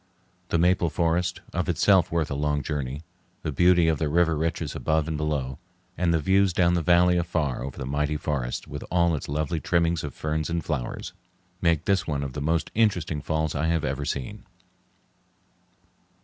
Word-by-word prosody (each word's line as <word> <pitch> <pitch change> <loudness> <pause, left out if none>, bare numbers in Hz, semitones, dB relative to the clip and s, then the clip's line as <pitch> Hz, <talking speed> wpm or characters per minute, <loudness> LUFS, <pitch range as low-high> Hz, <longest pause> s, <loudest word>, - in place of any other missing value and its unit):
The - - +2
maple 90 0 +3
forest, 85 +2 0
of 90 +1 -1
itself 95 +2 +3
worth 80 -3 0
a - - 0
long 75 0 0
journey, 70 0 -4 0.4
the 80 - -2
beauty 90 +2 +4
of 80 -3 +1
the 80 - 0
river 85 +1 +3
reaches 80 -1 -2
above 80 -1 0
and 80 - -2
below, 75 -4 -2 0.4
and 85 -1 +1
the 85 - +3
views 95 +4 +3
down 85 0 +3
the 85 - +1
valley 90 +2 +4
afar 80 -7 -1
over 70 0 -6
the - - -4
mighty 75 +3 -1
forests, 70 -5 -3
with - - -6
all 85 -1 +2
its 75 - -4
lovely 75 +2 -1
trimmings 85 -1 +1
of 75 - -6
ferns 75 0 -2
and 85 0 -2
flowers, 70 -7 -4 0.5
make 85 -3 +2
this 95 -3 +1
one 70 -3 -1
of 70 -2 -5
the 75 - -4
most 80 +3 0
interesting 90 -9 +1
falls 80 0 -1
I 75 +3 0
have 80 -2 +1
ever 70 +2 -2
seen. 70 -3 -4
80 Hz, 185 wpm, -26 LUFS, 75-85 Hz, 0.5 s, beauty